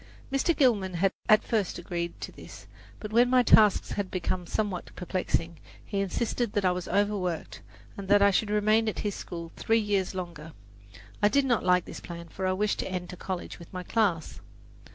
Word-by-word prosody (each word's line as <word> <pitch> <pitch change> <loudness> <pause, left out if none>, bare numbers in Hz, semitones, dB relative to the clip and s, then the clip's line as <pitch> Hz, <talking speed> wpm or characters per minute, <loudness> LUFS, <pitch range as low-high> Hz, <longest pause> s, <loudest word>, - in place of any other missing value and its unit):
Mr. 275 +5 +1
Gilman 200 - +2 0.3
at 215 0 +6
first 210 -5 -1
agreed 170 0 -4
to - - -6
this; - - -12 0.3
but 210 0 -7
when 240 +2 +5
my 255 0 +5
tasks 210 -3 +5
had 200 -2 -2
become 180 -1 -3
somewhat 200 -3 -2
perplexing, 170 -3 -2 0.3
he 200 - -3
insisted 220 +3 -1
that 205 -3 0
I 180 - +4
was 180 0 -4
overworked, 200 -5 -1 0.3
and 200 -1 -7
that 205 +1 +6
I 200 0 +5
should 205 +2 +1
remain 215 +1 +3
at - - -5
his 205 -1 -2
school 170 -2 -7
three 225 - +2
years 200 -4 0
longer. 165 -4 -6 0.7
I 205 - +5
did 280 +4 +3
not 240 -4 +1
like 180 -1 +3
his - - -8
plan, 170 -1 -9
for 190 +3 -3
I 185 - +2
wished 205 +2 0
to - - -2
enter 180 -1 -4
college 185 0 -5
with 170 - -13
my 185 -1 -5
class. 180 -6 0
195 Hz, 190 wpm, -28 LUFS, 180-215 Hz, 0.7 s, at